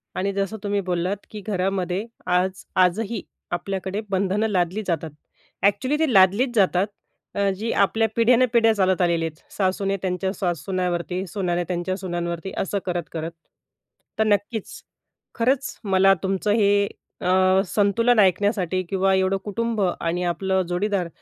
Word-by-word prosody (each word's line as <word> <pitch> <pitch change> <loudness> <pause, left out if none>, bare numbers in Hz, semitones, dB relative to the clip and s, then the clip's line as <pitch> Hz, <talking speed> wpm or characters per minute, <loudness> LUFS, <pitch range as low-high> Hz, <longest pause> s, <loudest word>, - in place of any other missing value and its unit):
आणि 195 +2 0
जसं 200 +2 -2
तुम्ही 205 0 0
बोललात 180 +1 -1
की 210 - -7
घरामध्ये 190 0 -1 0.2
आज 185 +1 0 0.2
आजही 210 +4 0 0.3
आपल्याकडे 190 +3 -3
बंधनं 200 +3 +1
लादली 185 +1 0
जातात. 160 -3 -2 0.5
अ‍ॅक्चुअली 255 +9 +2
ते 315 -5 +2
लादलीच 200 +6 +4
जातात 195 -1 +3 0.5
अ, 200 -1 +2
जी 225 +2 -2
आपल्या 220 +3 +3
पिढ्यान-पिढ्या 235 -1 +4
चालत 190 -2 +2
आलेली 170 -2 +2
आहेत. 160 -1 -5 0.2
सासूने 195 0 0
त्यांच्या 190 0 -1
सा 180 -4 -1
सुन्यावरती 180 +1 -2
सूनांनी 175 -2 -1
त्यांच्या 180 +1 -2
सुनांवरती 175 -1 -4
असं 200 +1 -1
करत-करत. 170 -2 -3 0.9
तर 220 - +5
नक्कीच. 205 +1 0 0.6
खरंच 260 +3 0
मला 195 -1 +4
तुमचं 195 +2 0
हे 205 -1 +3 0.3
अ, 185 +1 +4
संतुलन 220 +5 +2
ऐकण्यासाठी 190 -1 +2
किंवा 195 0 +2
एवढं 190 +1 +2
कुटुंब 225 +1 -2
आणि 175 -1 -1
आपलं 190 +2 0
जोडीदार 180 0 -1
190 Hz, 135 wpm, -23 LUFS, 180-205 Hz, 0.9 s, तर